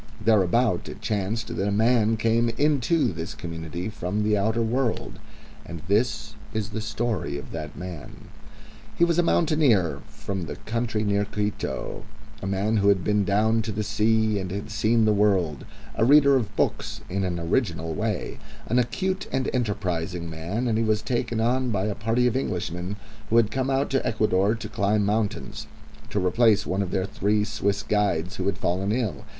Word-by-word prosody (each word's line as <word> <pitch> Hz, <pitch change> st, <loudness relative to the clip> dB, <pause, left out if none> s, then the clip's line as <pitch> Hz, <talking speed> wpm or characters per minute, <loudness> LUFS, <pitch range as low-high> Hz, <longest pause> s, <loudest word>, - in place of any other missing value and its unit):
Thereabouts 110 Hz, -1 st, +2 dB
it -, -, -8 dB
chanced 110 Hz, +2 st, -2 dB
that 95 Hz, -, -1 dB
a -, -, +1 dB
man 110 Hz, +1 st, +3 dB
came 115 Hz, +1 st, +2 dB
into 150 Hz, -, +2 dB
this 80 Hz, +6 st, -5 dB
community 85 Hz, -2 st, -5 dB
from 105 Hz, -1 st, -2 dB
the 105 Hz, 0 st, +2 dB
outer 110 Hz, +3 st, +1 dB
world. 120 Hz, +1 st, -1 dB, 0.4 s
And 85 Hz, -2 st, -8 dB
this 110 Hz, +1 st, 0 dB, 0.2 s
is 110 Hz, -1 st, -1 dB
the 110 Hz, 0 st, -4 dB
story 110 Hz, -9 st, -2 dB
of 70 Hz, -1 st, -9 dB
that -, -, -6 dB
man. 90 Hz, -4 st, -8 dB, 0.7 s
He 170 Hz, -, +4 dB
was 170 Hz, 0 st, +1 dB
a -, -, +7 dB
mountaineer 150 Hz, -, +2 dB
from 95 Hz, -3 st, -5 dB
the -, -, -5 dB
country 115 Hz, -1 st, -2 dB
near 100 Hz, -1 st, +1 dB
Quito, 105 Hz, 0 st, -3 dB, 0.4 s
a 95 Hz, -, -4 dB
man 100 Hz, +3 st, +1 dB
who 100 Hz, -1 st, +2 dB
had 100 Hz, -3 st, +4 dB
been 105 Hz, -1 st, +2 dB
down 110 Hz, +3 st, +2 dB
to 110 Hz, 0 st, -4 dB
the 105 Hz, +1 st, -2 dB
sea 110 Hz, 0 st, +2 dB
and 95 Hz, -1 st, -4 dB
had 100 Hz, +4 st, -5 dB
seen 110 Hz, +1 st, +2 dB
the 110 Hz, -, +4 dB
world, 95 Hz, -8 st, +1 dB, 0.3 s
a -, -, +1 dB
reader 140 Hz, +2 st, +6 dB
of 110 Hz, -5 st, -1 dB
books -, -, -1 dB
in 95 Hz, +1 st, -2 dB
an 90 Hz, -2 st, -2 dB
original 85 Hz, -3 st, -1 dB
way, -, -, -3 dB, 0.3 s
an 120 Hz, -, +2 dB
acute 185 Hz, +11 st, -1 dB
and 130 Hz, 0 st, 0 dB
enterprising 90 Hz, -7 st, -2 dB
man, 85 Hz, +10 st, -3 dB
and 110 Hz, -1 st, +1 dB
he -, -, +2 dB
was 110 Hz, -1 st, +1 dB
taken 120 Hz, -2 st, -1 dB
on 125 Hz, +3 st, +1 dB
by 100 Hz, -4 st, 0 dB
a 105 Hz, -, -1 dB
party 115 Hz, +4 st, +1 dB
of 125 Hz, -, +2 dB
Englishmen 90 Hz, -5 st, -2 dB, 0.3 s
who 115 Hz, -, +3 dB
had 115 Hz, -2 st, +4 dB
come 130 Hz, 0 st, -1 dB
out 135 Hz, +1 st, +1 dB
to 135 Hz, -, +1 dB
Ecuador 105 Hz, -1 st, +2 dB
to 110 Hz, -1 st, -6 dB
climb 105 Hz, 0 st, +1 dB
mountains, 105 Hz, 0 st, -2 dB, 0.4 s
to 105 Hz, -, -1 dB
replace 105 Hz, +2 st, +3 dB
one 95 Hz, +2 st, -1 dB
of 95 Hz, -, -2 dB
their 95 Hz, 0 st, 0 dB
three 105 Hz, +1 st, 0 dB
Swiss 100 Hz, -1 st, -1 dB
guides 100 Hz, -4 st, 0 dB
who 95 Hz, -, -2 dB
had 100 Hz, -3 st, 0 dB
fallen 95 Hz, +1 st, 0 dB
ill. 115 Hz, -3 st, -2 dB
105 Hz, 180 wpm, -25 LUFS, 95-115 Hz, 0.7 s, a